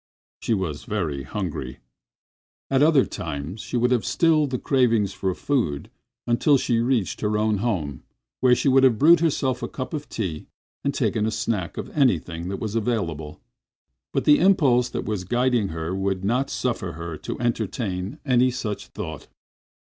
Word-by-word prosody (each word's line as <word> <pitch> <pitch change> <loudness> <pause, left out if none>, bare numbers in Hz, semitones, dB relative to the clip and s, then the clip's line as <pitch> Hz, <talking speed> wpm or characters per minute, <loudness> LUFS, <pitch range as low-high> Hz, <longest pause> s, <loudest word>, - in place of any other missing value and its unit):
She 115 - 0
was 85 -7 -4
very 80 -10 -2
hungry. 85 +5 -5 0.9
Another 140 +1 +5
time 80 +2 -5
she 115 - -4
would 125 +1 +2
have 120 -4 +2
stilled 155 - +2
the 130 - -1
cravings 115 -7 +2
for 95 -2 -2
food 85 - -1 0.3
until 130 +4 +3
reaching 120 -4 0
her 105 - 0
own 105 0 +1
home, 85 - -2 0.4
where 125 -1 +5
she - - -1
would 135 0 +5
have 125 -4 +5
brewed 165 +6 +6
herself 135 -6 0
a - - -2
cup 130 +2 -6
of 150 -1 -5
tea 90 -9 -4 0.4
and 140 - +1
taken 110 -6 0
a - - +1
snack 110 -5 -2
of - - -6
anything 85 - +1
that 100 - -3
was 110 0 -4
available. 95 -10 -2 0.7
But - - -1
the 150 - +6
impulse 135 -10 +4
that - - -4
was 105 -4 -2
guiding 120 +1 +1
her 80 0 -4
would 95 -1 -1
not 125 +6 +1
suffer 115 -8 -2
her 85 0 -6
to - - -6
entertain 105 -5 -2
any 130 -1 +4
such 110 -5 -4
thought. 80 -8 -7
110 Hz, 160 wpm, -24 LUFS, 90-130 Hz, 0.9 s, brewed